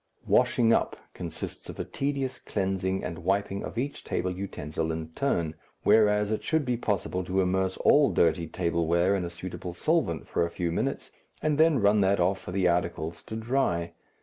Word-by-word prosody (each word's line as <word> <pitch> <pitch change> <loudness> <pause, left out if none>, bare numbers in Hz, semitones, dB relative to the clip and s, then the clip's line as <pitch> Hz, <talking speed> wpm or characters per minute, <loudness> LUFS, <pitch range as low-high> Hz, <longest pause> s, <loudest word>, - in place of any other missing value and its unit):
"Washing 115 -1 +4
up" - - +1 0.2
consists 85 -3 -7
of - - -8
a - - -2
tedious 135 -2 -2
cleansing 95 -1 -1
and 85 - -4
wiping 100 +2 -1
of - - -7
each 140 +4 -3
table 90 - -1
utensil 80 -4 -4
in 80 0 -4
turn, 85 - -1 0.3
whereas 105 -1 +4
it 110 - -1
should 160 -2 +1
be 125 -1 +1
possible 100 -5 -1
to 95 +2 -1
immerse 95 0 +1
all 145 -1 +5
dirty 85 0 +2
table 85 0 -1
wear 85 +3 +3
in 95 - -1
a 85 - -3
suitable 90 0 -7
solvent 135 - 0
for - - 0
a 85 - -1
few 85 0 -2
minutes - - -2 0.3
and 150 -1 +1
then 160 -2 +5
run 105 -1 +4
that 95 0 +3
off 95 +2 +2
for - - -8
the 95 -1 +2
articles 85 -1 -1
to 110 - -7
dry. 110 -8 0
95 Hz, 185 wpm, -28 LUFS, 85-110 Hz, 0.3 s, all